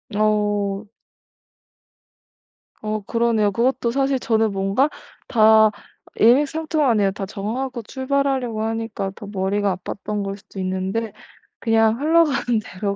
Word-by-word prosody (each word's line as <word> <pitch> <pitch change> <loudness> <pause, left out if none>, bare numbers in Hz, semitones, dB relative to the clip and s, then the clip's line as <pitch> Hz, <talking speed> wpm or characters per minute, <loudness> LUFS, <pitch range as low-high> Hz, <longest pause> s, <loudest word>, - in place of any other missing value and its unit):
어. 205 -1 0 1.9
어 215 0 -2
그러네요. 225 -1 +1
그것도 235 +1 0
사실 270 +1 +1
저는 225 -2 +1
뭔가 195 +8 +1 0.4
다 220 -1 +5 0.4
일맥상통하네요. 275 -4 +3
다 195 0 -5
정하고 235 +6 -4
출발하려고 265 -3 -1
하니까 225 -3 -3
더 205 - -10
머리가 200 0 0
아팠던 205 +3 -5
거일 195 0 -4
수도 205 -1 -12
있는데 190 +4 -2 0.5
그냥 225 0 +2
흘러가는 295 -7 +2
대로 200 +2 -4
220 Hz, 265 characters per minute, -21 LUFS, 200-250 Hz, 1.9 s, 다